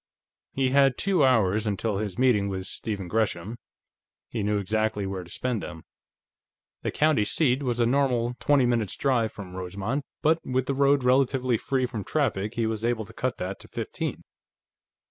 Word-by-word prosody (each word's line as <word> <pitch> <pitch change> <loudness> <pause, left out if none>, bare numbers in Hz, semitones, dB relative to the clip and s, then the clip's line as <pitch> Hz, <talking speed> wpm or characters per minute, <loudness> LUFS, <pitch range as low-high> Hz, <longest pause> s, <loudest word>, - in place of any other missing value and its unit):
He 130 -1 +1
had 135 0 +4
two 190 -6 +2
hours 110 -4 +3
until 105 0 -1
his 105 -4 -4
meeting 115 -6 +3
with 95 -1 -4
Stephen 100 -1 -4
Gresham; 110 +1 -1 0.7
he 115 - -3
knew 105 +1 +1
exactly 105 +1 -1
where 95 -1 -4
to 85 - -15
spend 120 +2 -2
them. 80 -2 -8 1.0
The - - -2
county 155 -7 +2
seat 130 +3 +2
was 125 -3 -1
a 120 - +4
normal 125 -2 +1
twenty 145 -3 +3
minutes' 115 -5 +1
drive 120 -5 +1
from 95 -3 -9
Rosemont, 95 +9 -3 0.2
but 160 +2 +4
with 130 0 -1
the 140 - -1
road 140 0 +3
relatively 130 -1 +3
free 130 +3 0
from 115 -5 -5
traffic 110 -6 -1
he 115 - 0
was 110 0 -2
able 115 -2 0
to - - -14
cut 130 0 -2
that 95 +2 -4
to - - -13
fifteen. - - -4
115 Hz, 175 wpm, -26 LUFS, 100-130 Hz, 1.0 s, had